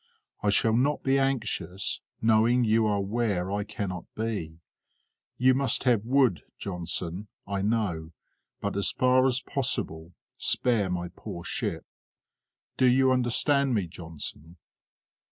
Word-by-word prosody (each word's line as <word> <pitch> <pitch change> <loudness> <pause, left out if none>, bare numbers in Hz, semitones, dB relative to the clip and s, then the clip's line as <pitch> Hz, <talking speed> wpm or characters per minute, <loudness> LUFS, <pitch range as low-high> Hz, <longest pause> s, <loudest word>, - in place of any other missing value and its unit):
I 105 - +1
shall 110 +2 +3
not 140 +5 +1
be 135 0 +3
anxious, 115 -8 -1 0.2
knowing 115 +2 +4
you 110 0 +3
are 105 -1 +1
where 100 -3 -1
I 100 0 -1
cannot 100 -4 -5
be. 105 -8 -3 0.8
You 130 +1 +5
must 130 -3 +1
have 120 -6 +3
wood, 125 - +3 0.2
Johnson, 90 +1 -3 0.2
I 100 -1 -2
know, 100 -7 -1 0.5
but, 100 - -2
as 100 - +2
far 130 +1 +3
as 130 +1 0
possible, 85 - -1 0.3
spare 110 -6 +2
my 90 -1 -3
poor 85 - -7
ship. - - -3 0.9
Do 130 - +4
you 130 +1 +4
understand 130 +2 +2
me, 100 -4 0
Johnson?" 80 -1 -7
110 Hz, 130 wpm, -27 LUFS, 90-125 Hz, 0.9 s, You